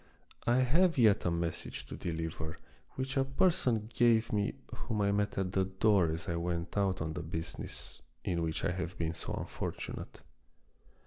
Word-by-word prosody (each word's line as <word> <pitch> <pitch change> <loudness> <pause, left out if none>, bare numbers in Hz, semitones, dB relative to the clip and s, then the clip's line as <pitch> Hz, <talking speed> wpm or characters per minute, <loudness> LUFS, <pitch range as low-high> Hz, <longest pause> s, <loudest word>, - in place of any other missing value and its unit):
I 120 +2 +5
have 165 +6 +4
yet 110 -5 +5
a - - +4
message 85 -1 -2
to - - -7
deliver 80 -2 -3 0.4
which 135 +1 -2
a 135 - +5
person 135 - +2
gave 115 -1 +4
me 105 +4 +1 0.2
whom 110 -4 -2
I 100 0 +3
met 105 0 0
at 95 -1 0
the 95 -1 +2
door 95 -1 +3
as 80 +4 -4
I 85 -1 0
went 85 0 -2
out 95 -4 +1
on 80 0 -3
the 85 - -3
business 80 0 -5 0.2
in 85 -2 0
which 80 -1 -1
I - - +2
have 90 0 -3
been 80 -1 -1
so - - -5
unfortunate. - - -5
95 Hz, 175 wpm, -33 LUFS, 85-115 Hz, 0.4 s, I